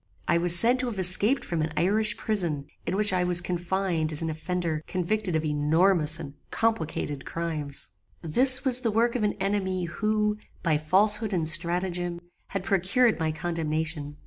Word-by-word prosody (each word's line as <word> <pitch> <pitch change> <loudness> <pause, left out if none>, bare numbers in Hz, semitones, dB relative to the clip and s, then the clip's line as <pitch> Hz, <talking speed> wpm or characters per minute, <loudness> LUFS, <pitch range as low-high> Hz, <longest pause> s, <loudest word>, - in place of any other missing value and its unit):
I 170 - +2
was 175 0 +8
said 240 +7 +4
to 255 - -1
have 225 -4 -5
escaped 195 +8 +2
from 170 -2 -3
an 155 +1 -3
Irish 215 +5 +3
prison, 170 -10 -2 0.2
in - - -1
which 205 -1 +2
I 180 -1 +1
was 180 -1 +6
confined 175 -2 -2
as 155 +1 -2
an 160 - -2
offender 160 0 -3
convicted 185 0 -2
of 160 0 -1
enormous 155 +2 +2
and 140 -3 -8 0.2
complicated 160 -10 -2
crimes. 155 -4 -4 0.4
"This 255 - +3
was 255 -2 +6
the 245 -3 -1
work 230 +2 +1
of 245 - -1
an 210 -1 0
enemy, 190 -2 -2
who, 210 +4 -1 0.3
by 160 -3 +1
falsehood 210 +6 +1
and 165 -4 -1
stratagem, 175 +2 -1 0.3
had 195 -2 -5
procured 200 +4 +1
my 160 -1 -1
condemnation. 155 -2 -4
180 Hz, 170 wpm, -26 LUFS, 160-210 Hz, 0.4 s, was